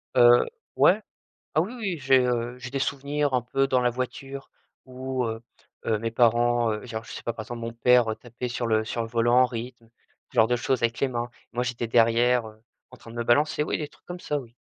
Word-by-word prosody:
Heu, 120 -1 +7 0.3
ouais, 210 +4 +5 0.5
ah 155 - +5
oui, 210 +9 -4
oui, 200 -8 -3
j'ai, 135 -2 +4
heu, 120 0 -1
j'ai 125 0 -7
des 135 +1 -3
souvenirs 140 +1 -1
un 125 - +2
peu 135 +3 0
dans 130 -1 +2
la 125 - +3
voiture 135 +2 -5 0.4
où, 130 0 -3
heu 115 0 -4 0.4
heu, 110 - +1
mes 115 0 -3
parents, 120 0 +3
heu 105 +3 -6
genre, 115 -2 -5
je - - -11
sais - - -8
pas, 115 - -1
par 110 -1 -7
exemple, 120 0 -7
mon 115 0 -4
père 125 0 +4
tapait 120 +1 -6
sur 120 -1 -2
le 110 -1 +2
sur 115 +1 -3
le 115 - -3
volant 120 +1 +2
en - - +5
rythme, 120 -1 -7 0.4
ce - - -18
genre 110 -1 +5
de 120 - +2
choses 125 0 -1
avec 115 0 0
les 140 - +2
mains 120 -1 -3 0.2
et - - -22
moi, 125 - +1
j'étais 120 -1 -3
derrière, 115 +1 +3
heu, 110 0 -15 0.3
en 130 - -13
train 115 - -13
de 115 - -11
me 120 - -2
balancer 150 +5 +2
oui, - - -1
des 150 - -4
trucs - - -25
comme 175 0 -7
ça, 150 -3 -2
oui. 120 -3 -13
120 Hz, 245 wpm, -26 LUFS, 115-130 Hz, 0.5 s, Heu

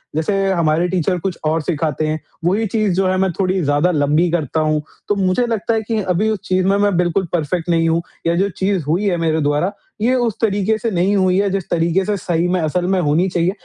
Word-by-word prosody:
जैसे 160 +6 0 0.2
हमारे 170 -1 +1
टीचर 180 0 0
कुछ 185 0 -3
और 160 +1 +1
सिखाते 155 -1 -1
हैं, 155 0 -2 0.3
वही 205 +6 +2
चीज़ 210 -2 0
जो 190 +1 +1
है 185 0 +1
मैं 190 -1 +1
थोड़ी 185 0 +1
ज़्यादा 145 +5 +2
लंबी 150 +2 +2
करता 160 -2 -1
हूँ, 155 -1 +1 0.3
तो 205 - +1
मुझे 195 +5 +1
लगता 230 0 -1
है 220 - 0
कि 225 -2 0
अभी 185 +3 0
उस 215 -2 -1
चीज़ 185 0 +1
में 195 +1 +3
मैं 205 -1 +2
बिल्कुल 180 +2 +1
परफेक्ट 170 +1 -1
नहीं 165 -1 +2
हूँ 165 +1 +1 0.3
या 170 - +2
जो 195 +3 +1
चीज़ 190 -3 0
हुई 175 +7 +1
है 175 - 0
मेरे 160 -1 0
द्वारा 145 +6 +1 0.3
ये 240 +4 +2
उस 240 -3 +1
तरीके 210 0 +1
से 230 +2 -2
नहीं 190 +2 +1
हुई 185 -1 +2
है 200 0 +1
जिस 195 -2 -3
तरीके 170 +3 +1
से 210 +1 0
सही 175 -1 -1
में, 180 0 0
असल 170 +3 -1
में 190 0 +1
होनी 160 +5 +2
चाहिए, 175 0 +1
180 Hz, 235 wpm, -18 LUFS, 165-195 Hz, 0.3 s, में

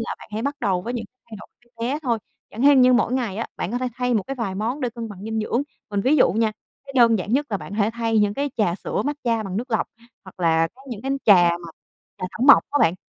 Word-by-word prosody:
là 230 - -3
bạn - - -13
hãy 220 +2 -3
bắt 285 +1 -2
đầu 190 -5 0
với 240 +4 -4
những 225 -2 -3 0.3
thay 215 - -7
đổi - - -11 0.2
bé 235 -1 -6
bé - - -2
thôi, 235 -4 0 0.3
chẳng 230 +5 -5
hên 280 -2 +7
như 250 0 +6
mỗi 245 0 +2
ngày 235 -7 -1
á, 225 - -3
bạn 185 - -3
có 245 - -1
thể 255 0 -2
thay 250 -1 0
một 210 - +2
cái 270 - -5
vài 200 -6 -3
món 230 +8 -2
để 250 -2 -1
cân 230 -1 -6
bằng 200 -1 -10
dinh 220 0 -2
dưỡng. 235 +5 0 0.3
Mình 205 - 0
ví 275 +9 +3
dụ - - +4
nha, 220 +1 +1 0.3
cái 275 - -9
đơn 230 -3 +5
giản 200 +4 -4
nhất 290 +3 +2
là 200 - 0
bạn 195 - -9
hãy 210 +1 +1
thay 225 -1 0
những 205 0 +2
cái 285 0 -2
trà 180 -6 +1
sữa - - -3
matcha 245 -6 -1
bằng 195 -1 -5
nước 245 +3 -4
lọc, 220 - +1 0.4
hoặc 190 0 -14
là 165 -1 +3
có 265 - -18
những 230 -2 -6
cái 270 - -3
trà 180 -5 +6
mà 170 -1 -5 0.5
trà - - -4
thảo - - -10
mộc 280 - +9
á 290 - +1
bạn, 165 - +4
225 Hz, 290 wpm, -23 LUFS, 200-250 Hz, 0.5 s, mộc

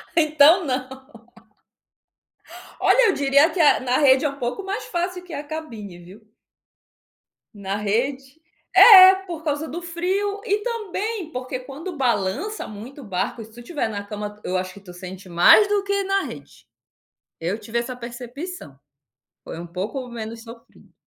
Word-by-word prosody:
Então, 310 +2 +5
não. 265 0 -4 1.7
Olha - - +4
eu - - +2
diria 280 +2 +3
que 345 - -6
é 305 -3 +5
a - - -5
na 255 0 0
rede 270 -1 +4
é - - +2
um 275 - -9
pouco 250 +9 -4
mais 390 +2 -4
fácil 360 +1 -3
que 360 -2 -11
a 285 0 -5
cabine, 235 - -8
viu? 200 +5 -16 1.2
Na 200 -1 -4
rede. 260 +8 -2 0.3
É, 380 -4 +10
por 335 -4 -7
causa 300 0 -2
do 340 +3 -6
frio 375 +4 -2
e 415 +1 0
também 435 -5 -4
porque 255 0 -5
quando 295 +7 -8
balança 255 - -1
muito 230 +7 -10
o - - -11
barco, 200 +2 -3
e 220 - -8
se 220 - -19
tu 235 - -14
estiver 275 -1 -3
na 205 -2 -5
cama, 210 0 -7
eu 185 - -2
acho 185 0 -3
que - - -13
tu 185 -3 -13
sente 185 +1 -10
mais 180 - +6
do 410 -1 0
que 400 0 -1
na 390 0 0
rede. - - -11 0.7
Eu 180 +7 -3
tive 230 +1 -5
essa 240 +1 -3
percepção. 245 - -8 0.6
Foi - - -8
um 170 - -7
pouco 200 +10 -5
menos 230 -1 -7
sofrido. 230 0 -16
265 Hz, 170 wpm, -22 LUFS, 215-350 Hz, 1.7 s, É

